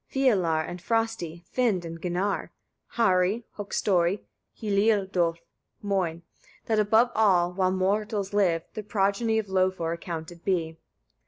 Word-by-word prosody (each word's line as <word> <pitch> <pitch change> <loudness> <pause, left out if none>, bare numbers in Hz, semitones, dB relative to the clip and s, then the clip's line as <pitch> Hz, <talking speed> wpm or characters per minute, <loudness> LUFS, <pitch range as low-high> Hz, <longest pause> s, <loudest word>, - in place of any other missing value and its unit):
Fialar 190 -12 +2
and 175 0 -7
Frosti, 225 -7 -2
Finn 220 -9 0
and 165 0 -7
Ginnar, 185 +3 -1 0.4
Heri, 195 +1 +2
Höggstari, 195 -2 +1 0.4
Hliôdôlf, 200 -5 +2 0.5
Moin: 180 -5 -1 0.4
that 220 -1 +1
above 220 +3 +4
shall, 180 -5 +3
while 185 0 +1
mortals 200 +2 -1
live, 175 -5 +2
the 215 - -4
progeny 210 +2 +1
of 220 -2 -1
Lofar, 185 -3 0
accounted 170 0 -7
be. 165 -4 -1
190 Hz, 115 wpm, -27 LUFS, 175-210 Hz, 0.5 s, above